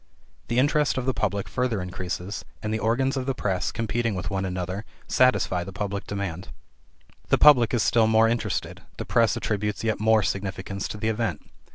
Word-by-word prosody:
The 120 Hz, -, -1 dB
interest 145 Hz, +2 st, +2 dB
of 130 Hz, -, -1 dB
the 130 Hz, -, +1 dB
public 100 Hz, -4 st, -1 dB
further 125 Hz, -4 st, -1 dB
increases, 90 Hz, +2 st, -5 dB, 0.2 s
and 105 Hz, 0 st, -2 dB
the 110 Hz, -, 0 dB
organs 120 Hz, +6 st, +1 dB
of 130 Hz, 0 st, -3 dB
the 135 Hz, -, 0 dB
press, 95 Hz, -7 st, -1 dB
competing 115 Hz, 0 st, -1 dB
with 95 Hz, -, -4 dB
one 95 Hz, 0 st, -1 dB
another, 90 Hz, +2 st, -3 dB, 0.2 s
satisfy 125 Hz, -8 st, +2 dB
the 95 Hz, -, -8 dB
public 100 Hz, +2 st, -4 dB
demand. 95 Hz, -3 st, -4 dB, 0.8 s
The -, -, +4 dB
public 125 Hz, -7 st, +6 dB
is 120 Hz, -3 st, +1 dB
still 115 Hz, -2 st, +4 dB
more 110 Hz, 0 st, +5 dB
interested; 115 Hz, +1 st, -2 dB, 0.2 s
the -, -, -5 dB
press 115 Hz, -1 st, +2 dB
attributes 105 Hz, 0 st, -2 dB
yet 110 Hz, -2 st, 0 dB
more 110 Hz, 0 st, +4 dB
significance 95 Hz, +1 st, -3 dB
to -, -, -6 dB
the 110 Hz, +1 st, -1 dB
event. 110 Hz, -8 st, -2 dB
105 Hz, 185 wpm, -25 LUFS, 95-120 Hz, 0.8 s, public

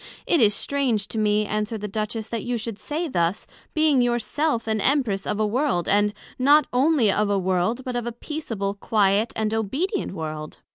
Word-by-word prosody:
It 335 Hz, -, +3 dB
is 210 Hz, -2 st, +4 dB
strange 245 Hz, -8 st, 0 dB
to 225 Hz, -, -3 dB
me, 210 Hz, 0 st, +2 dB
answered 215 Hz, +1 st, -2 dB
the 210 Hz, -, -3 dB
Duchess, 215 Hz, +2 st, -3 dB
that 230 Hz, -2 st, -3 dB
you 245 Hz, 0 st, -1 dB
should 220 Hz, -2 st, -5 dB
say 320 Hz, +3 st, -3 dB
thus, 175 Hz, -, 0 dB, 0.3 s
being 310 Hz, -4 st, +4 dB
your 240 Hz, -1 st, +2 dB
self, 275 Hz, +1 st, -1 dB
an 220 Hz, -1 st, 0 dB
Empress 245 Hz, -8 st, +1 dB
of 210 Hz, -, -1 dB
a 215 Hz, -, +2 dB
World; 230 Hz, -, 0 dB
and 205 Hz, +1 st, +3 dB, 0.3 s
not 290 Hz, +3 st, +5 dB
onely 260 Hz, -4 st, +3 dB
of 210 Hz, +1 st, +1 dB
a 200 Hz, -, +2 dB
world, 190 Hz, +6 st, 0 dB
but 250 Hz, -1 st, -3 dB
of 240 Hz, -1 st, -2 dB
a -, -, -2 dB
peaceable, 230 Hz, -6 st, -4 dB
quiet, 205 Hz, +1 st, +1 dB
and 220 Hz, 0 st, -1 dB
obedient 270 Hz, -, -1 dB
world. 155 Hz, -3 st, -6 dB
220 Hz, 195 wpm, -24 LUFS, 205-260 Hz, 0.3 s, not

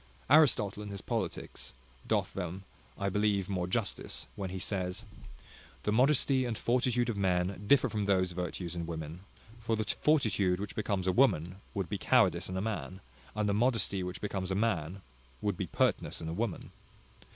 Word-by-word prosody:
Aristotle, 110 Hz, -10 st, +5 dB
in 105 Hz, -, -6 dB
his 100 Hz, -1 st, -5 dB
Politics, 60 Hz, -6 st, -4 dB, 0.3 s
doth -, -, +1 dB
them, 95 Hz, 0 st, -4 dB, 0.3 s
I 100 Hz, -, -1 dB
believe, 100 Hz, -1 st, +1 dB
more 90 Hz, -2 st, -1 dB
justice, 100 Hz, +2 st, -2 dB
when 95 Hz, -2 st, -4 dB
he 95 Hz, -, -5 dB
says, 95 Hz, +2 st, -2 dB, 0.8 s
"The 105 Hz, -, +1 dB
modesty 130 Hz, +2 st, +3 dB
and 120 Hz, -3 st, -2 dB
fortitude 120 Hz, 0 st, +1 dB
of 115 Hz, -4 st, -2 dB
men 95 Hz, 0 st, 0 dB
differ 135 Hz, +1 st, +5 dB
from 105 Hz, -3 st, -2 dB
those 95 Hz, -2 st, +2 dB
virtues 90 Hz, 0 st, -4 dB
in 85 Hz, -1 st, -3 dB
women; 80 Hz, 0 st, -5 dB, 0.4 s
for 115 Hz, 0 st, 0 dB
the 110 Hz, -, -1 dB
fortitude 110 Hz, -10 st, +2 dB
which 100 Hz, 0 st, -5 dB
becomes 100 Hz, -3 st, -1 dB
a 95 Hz, -, +3 dB
woman, 90 Hz, -, +3 dB, 0.2 s
would 95 Hz, -3 st, -1 dB
be 100 Hz, +2 st, -3 dB
cowardice 95 Hz, -9 st, +3 dB
in 95 Hz, -, -3 dB
a -, -, 0 dB
man; 100 Hz, -3 st, -3 dB, 0.4 s
and 105 Hz, -1 st, 0 dB
the 100 Hz, -, +2 dB
modesty 110 Hz, -3 st, +2 dB
which 90 Hz, 0 st, -5 dB
becomes 95 Hz, -3 st, -3 dB
a 95 Hz, -, 0 dB
man, 95 Hz, -3 st, -1 dB, 0.4 s
would 100 Hz, +3 st, -1 dB
be -, -, -3 dB
pertness -, -, 0 dB
in 80 Hz, -, -5 dB
a 80 Hz, -, -3 dB
woman." 105 Hz, 0 st, -3 dB
100 Hz, 175 wpm, -31 LUFS, 90-110 Hz, 0.8 s, Aristotle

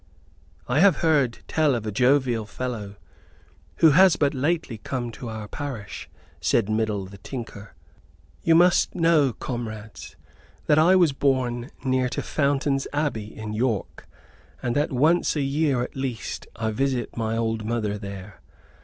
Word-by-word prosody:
"I 125 Hz, +4 st, +1 dB
have 195 Hz, +1 st, +5 dB
heard 140 Hz, -7 st, +2 dB
tell 155 Hz, -4 st, +2 dB
of 115 Hz, -2 st, -4 dB
a 105 Hz, -, -2 dB
jovial 125 Hz, -1 st, +2 dB
fellow 110 Hz, -3 st, -5 dB, 0.8 s
who 160 Hz, -2 st, +6 dB
has 185 Hz, +3 st, +6 dB
but 145 Hz, -2 st, +1 dB
lately 145 Hz, -4 st, -1 dB
come 120 Hz, +1 st, -4 dB
to 120 Hz, +1 st, -8 dB
our 110 Hz, -1 st, -6 dB
parish," 125 Hz, -6 st, -6 dB, 0.3 s
said 110 Hz, -3 st, +1 dB
Middle 110 Hz, -2 st, -1 dB
the 100 Hz, +1 st, -12 dB
Tinker. 115 Hz, -3 st, -8 dB, 0.7 s
"You 165 Hz, -, +4 dB
must 175 Hz, +1 st, +4 dB
know, 165 Hz, -6 st, +3 dB
comrades, 110 Hz, -3 st, -7 dB, 0.5 s
that 150 Hz, -, +4 dB
I 175 Hz, +4 st, +5 dB
was 175 Hz, -6 st, +4 dB
born 130 Hz, -3 st, 0 dB, 0.2 s
near 130 Hz, -1 st, +1 dB
to -, -, -3 dB
Fountain's 140 Hz, -1 st, 0 dB
Abbey, 145 Hz, -8 st, -2 dB
in 110 Hz, -1 st, -5 dB
York, 110 Hz, -2 st, -2 dB, 0.6 s
and 120 Hz, -1 st, -1 dB
that 145 Hz, +2 st, +1 dB
once 155 Hz, +8 st, +2 dB
a 145 Hz, -, 0 dB
year 135 Hz, -2 st, +1 dB
at -, -, -7 dB
least 130 Hz, -6 st, -4 dB
I 110 Hz, -1 st, -2 dB
visit 130 Hz, +1 st, -1 dB
my 115 Hz, -1 st, -1 dB
old 115 Hz, -1 st, -1 dB
mother 105 Hz, -2 st, -2 dB
there. 100 Hz, -1 st, -9 dB
125 Hz, 150 wpm, -24 LUFS, 110-145 Hz, 0.8 s, who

